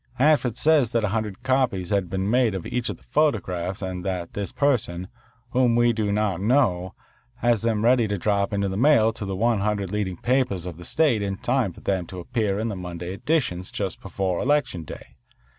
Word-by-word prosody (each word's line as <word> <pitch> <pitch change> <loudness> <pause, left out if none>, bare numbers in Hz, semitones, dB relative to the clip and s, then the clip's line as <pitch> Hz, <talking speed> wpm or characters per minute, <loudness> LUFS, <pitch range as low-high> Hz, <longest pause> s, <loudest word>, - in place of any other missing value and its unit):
Hanford 130 -3 +2
says 145 -5 +3
that 115 -1 +1
a 105 - +1
hundred 105 -2 -3
copies 125 -9 0
have 100 -4 +1
been 95 +1 -2
made 120 -2 +2
of 95 - -5
each 125 -1 -2
of - - -4
the - - -25
photographs 95 - 0
and 90 -1 -4
that 90 -3 -3
this 100 -3 -4
person, 105 -10 0 0.4
whom 125 -2 +3
we 120 0 +4
do 110 -2 -1
not 100 -3 0
know, 100 -6 +1 0.4
has 120 -2 +1
them 110 -1 0
ready 120 -2 +4
to 100 0 -2
drop 100 +3 0
into 100 -1 0
the 95 - -3
mail 115 -3 +4
to 110 - -6
the 95 -1 -3
one 115 +2 +2
hundred 100 -2 -1
leading 100 -4 -2
papers 125 -8 0
of 90 -3 -6
the 90 - -10
state 145 - +2
in 100 -1 -2
time 125 -4 0
for - - -15
them 95 -3 -1
to 90 - -8
appear 100 +2 -1
in 110 +2 -1
the 105 - -3
Monday 90 0 -6
editions 100 - -1
just 95 -3 -4
before 95 -1 -2
Election 130 - +1
Day. - - -11
105 Hz, 210 wpm, -24 LUFS, 95-120 Hz, 0.4 s, we